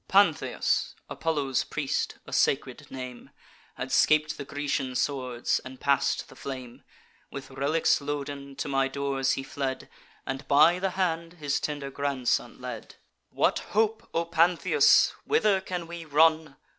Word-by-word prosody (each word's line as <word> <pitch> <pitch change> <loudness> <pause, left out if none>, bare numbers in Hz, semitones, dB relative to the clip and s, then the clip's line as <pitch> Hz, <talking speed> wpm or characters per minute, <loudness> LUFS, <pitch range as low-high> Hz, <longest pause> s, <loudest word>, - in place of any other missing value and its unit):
"Pantheus, 195 -5 +2 0.2
Apollo's 145 -5 0
priest, - - -2
a - - -10
sacred - - 0
name, 125 -2 -8 0.5
Had - - -5
scap'd 155 0 +3
the 140 - -7
Grecian 140 -2 -2
swords, 125 -3 0
and 130 0 -10
pass'd 140 0 +1
the - - -15
flame: 130 -3 -8 0.5
With 135 -1 -8
relics 140 +4 +1
loaden, 140 -1 -5
to - - -4
my 135 -1 +2
doors 135 -1 0
he 135 - -3
fled, 135 -1 -4 0.4
And 135 +1 -5
by 155 +5 +5
the 195 +1 0
hand 170 -2 -1
his 150 -5 -1
tender 145 -2 -4
grandson 140 -3 -1
led. - - -7 0.3
'What - - +1 0.2
hope, 220 0 +1
O 165 0 0
Pantheus? 170 - +4
whither 210 - +2
can 180 -2 -4
we 170 0 -7
run? 155 0 +3
145 Hz, 140 wpm, -27 LUFS, 135-165 Hz, 0.5 s, by